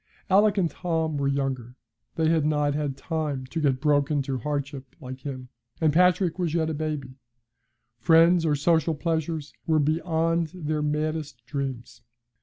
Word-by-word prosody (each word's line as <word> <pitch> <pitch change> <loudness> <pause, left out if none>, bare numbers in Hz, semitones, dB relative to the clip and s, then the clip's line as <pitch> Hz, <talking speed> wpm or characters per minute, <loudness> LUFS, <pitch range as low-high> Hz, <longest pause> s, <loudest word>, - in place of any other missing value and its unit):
Alick 205 +2 +5
and 185 -3 +3
Tom 160 -3 -1
were 140 - +1
younger. 135 -3 -2 0.4
They 160 -1 +1
had 160 -1 +3
not 150 -1 +1
had 145 -2 -2
time 150 -5 -3
to 160 +5 -4
get 135 -3 +2
broken 145 0 +2
to 135 -1 -3
hardship 140 -1 -4
like 130 -2 -8
him, 130 -2 -7 0.3
and 155 -3 +2
Patrick 180 0 +3
was 170 -3 -1
yet 160 -1 +1
a - - -2
baby. 150 -4 -4 0.9
Friends 165 +5 +5
or 155 -2 +2
social 160 +2 +2
pleasures 160 -1 -2
were 160 -1 +3
beyond 165 +2 +1
their 155 -3 -2
maddest 150 -4 -2
dreams. 130 -3 -5
150 Hz, 155 wpm, -26 LUFS, 140-165 Hz, 0.9 s, Alick